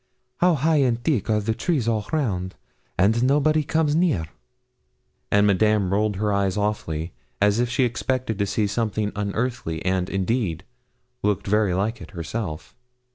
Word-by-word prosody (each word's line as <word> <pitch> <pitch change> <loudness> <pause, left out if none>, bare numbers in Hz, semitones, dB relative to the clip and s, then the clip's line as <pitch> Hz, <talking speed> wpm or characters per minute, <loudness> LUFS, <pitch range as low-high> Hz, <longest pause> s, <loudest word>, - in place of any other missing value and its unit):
How 180 +2 +4
high 155 +3 +2
and 125 -4 +2
thick 140 - 0
are 105 -1 +3
the 110 +2 0
trees 140 -2 -1
all 110 -2 0
round! 100 - -1 0.4
and 110 +5 +3
nobody 150 +4 +3
comes 155 0 +1
near.' 160 - +2 1.0
And 100 0 +4
Madame 105 -1 +2
rolled 105 0 +1
her 105 +1 0
eyes 100 -1 0
awfully, 85 -6 -2 0.3
as 105 +2 +3
if 120 0 +1
she 125 +2 +1
expected 125 -2 -1
to 100 - +1
see 105 +1 0
something 105 0 -1
unearthly, 100 -5 -2
and, 95 -1 0
indeed, 95 -4 -1 0.6
looked 105 -2 0
very 105 -2 +2
like 110 +4 -1
it - - -9
herself. 85 -1 -5
105 Hz, 155 wpm, -23 LUFS, 100-125 Hz, 1.0 s, How